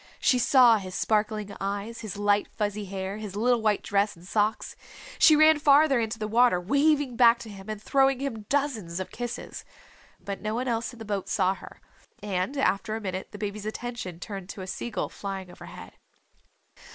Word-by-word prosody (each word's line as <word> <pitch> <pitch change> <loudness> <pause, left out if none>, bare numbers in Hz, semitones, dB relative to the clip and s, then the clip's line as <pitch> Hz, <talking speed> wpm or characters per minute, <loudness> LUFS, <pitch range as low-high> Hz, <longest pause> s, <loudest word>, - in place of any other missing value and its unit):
She 250 - +3
saw 245 -2 +6
his 185 -2 -8
sparkling 210 -1 -1
eyes, 200 +4 -4
his 210 -3 -6
light 205 0 +2
fuzzy 205 0 -3
hair, 190 +1 -5
his 210 -3 -7
little 240 +2 +2
white 215 -2 +1
dress 205 +1 +1
and 170 +1 -16
socks. 210 +3 -1 0.4
She 310 - +7
ran 310 0 +6
farther 285 -2 +5
into 225 -1 -2
the 215 -1 -3
water, 230 -3 +4
waving 280 - +2
back 235 -1 +6
to 225 - -9
him 195 +1 -11
and 215 -1 -4
throwing 270 +3 +2
him 225 -7 -5
dozens 230 -12 -1
of 185 - -5
kisses. 240 0 -6 0.6
But 200 -1 -6
no 215 +1 -2
one 250 +2 -2
else 230 0 -1
in 240 - -14
the 225 - -9
boat 200 -2 -3
saw 185 +1 +2
her, - - -13 0.4
and 200 +6 -2
after 215 -4 0
a - - -3
minute 185 -2 -4
the 205 - -10
baby's 210 0 -5
attention 220 -6 -5
turned 195 -1 -7
to 195 - -7
a - - -5
sea 190 - -5
gull 210 -5 -2
flying 195 -2 -6
overhead. - - -11
215 Hz, 190 wpm, -27 LUFS, 200-245 Hz, 0.6 s, She